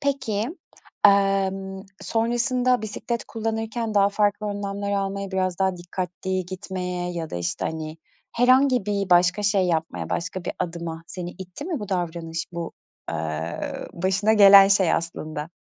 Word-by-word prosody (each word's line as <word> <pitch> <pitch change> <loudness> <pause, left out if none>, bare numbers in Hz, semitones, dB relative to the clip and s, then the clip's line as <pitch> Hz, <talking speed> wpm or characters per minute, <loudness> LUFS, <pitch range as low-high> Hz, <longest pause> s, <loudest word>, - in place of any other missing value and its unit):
Peki, 265 -7 -1 0.6
amm, 195 -1 +3 0.2
sonrasında 240 +4 +1
bisiklet 225 +2 -3
kullanırken 225 0 -3
daha 200 -1 +5
farklı 205 0 +1
önlemler 200 0 -3
almaya, 195 0 -2
biraz 185 -2 0
daha 190 -1 +2
dikkatli 180 +1 -4
gitmeye 180 -1 -4
ya 165 -2 -4
da, - - -4
işte, 85 +1 -2
hani, 160 -1 -5 0.4
herhangi 255 -2 +4
bir 200 -2 -1
başka 180 +3 +4
şey 200 -2 +3
yapmaya, 165 -1 -2
başka 180 +1 -3
bir - - -2
adıma 165 -1 -4
seni 180 -2 -6
itti 185 +9 -8
mi 330 -8 -3
bu 205 - -6
davranış, 165 -2 -2
bu, 170 -1 -5 0.4
eee, 80 +1 -3 0.3
başına 190 +4 +1
gelen 200 -2 +9
şey 195 -4 +4
aslında? 155 -2 -4
190 Hz, 140 wpm, -24 LUFS, 175-210 Hz, 0.6 s, gelen